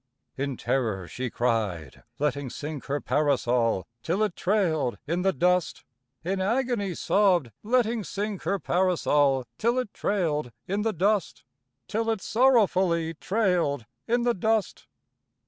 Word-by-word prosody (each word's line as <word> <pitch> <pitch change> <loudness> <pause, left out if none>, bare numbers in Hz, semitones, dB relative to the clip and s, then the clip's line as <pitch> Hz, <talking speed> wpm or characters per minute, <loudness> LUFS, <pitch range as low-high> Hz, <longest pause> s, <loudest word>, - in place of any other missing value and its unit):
In 135 -2 -3
terror 110 -8 -1
she 130 +5 -4
cried, 105 - -1 0.2
letting 140 -2 -1
sink 150 +2 -6
her 145 +1 -1
Parasol 125 -9 +1 0.2
till 180 - 0
it 210 -5 -1
trailed 175 - +1
in 170 +4 -1
the 190 +1 +3
dust; 180 +2 +1 0.4
In 190 +3 -1
agony 225 -3 0
sobbed, 180 - +2
letting 230 -1 +1
sink 205 0 -4
her 200 - 0
Parasol 150 -8 +2
till 235 +3 +2
it 250 -5 -2
trailed 155 -10 -1 0.2
in 200 +3 -1
the 225 +1 +1
dust, 200 +1 0 0.4
Till 225 +1 -1
it 220 -2 0
sorrowfully 190 -9 +3
trailed 175 - 0 0.2
in 240 +1 +2
the 240 0 +3
dust. 220 0 -1
180 Hz, 130 wpm, -26 LUFS, 140-210 Hz, 0.4 s, the